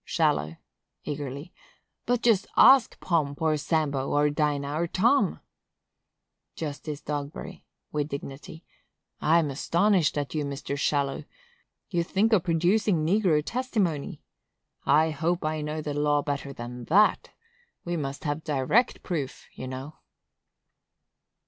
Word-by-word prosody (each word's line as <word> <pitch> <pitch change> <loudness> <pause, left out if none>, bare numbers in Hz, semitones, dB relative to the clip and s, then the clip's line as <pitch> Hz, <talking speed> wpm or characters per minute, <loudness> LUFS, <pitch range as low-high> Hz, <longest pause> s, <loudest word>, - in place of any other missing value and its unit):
Shallow. 75 +3 0 0.5
[Eagerly.] 145 +3 -6 0.5
But 245 -1 +1
just 215 -5 +3
ask 265 -3 +6
Pomp, 150 -5 0
or 160 -1 +2
Sambo, 145 -3 -1
or 145 0 +2
Dinah, 145 -1 -1
or 170 +3 0
Tom! 190 - +2 1.1
Justice 150 -1 -5
Dogberry. 150 +5 -6 0.3
[With 150 0 -2
dignity.] 140 +3 -8 0.5
I'm 160 -2 +3
astonished 175 +4 +2
at 145 -1 -3
you, 155 -2 -1
Mr. 140 0 -4
Shallow! 140 -1 0 0.7
You 170 -2 +1
think 210 +6 +1
of 205 - +5
producing 175 0 +2
negro 175 -4 +2
testimony? 210 - -2 0.6
I 155 +3 +4
hope 165 +3 -1
I 155 0 -1
know 150 +1 -4
the 150 - -3
law 145 0 +1
better 140 -1 -3
than 120 -1 -8
that! 205 - +3 0.6
We 175 0 -2
must 140 -3 -4
have 150 0 -2
direct 155 - +1
proof, 150 -7 -4
you 130 - -7
know. 130 +4 -7
155 Hz, 125 wpm, -27 LUFS, 140-175 Hz, 1.1 s, ask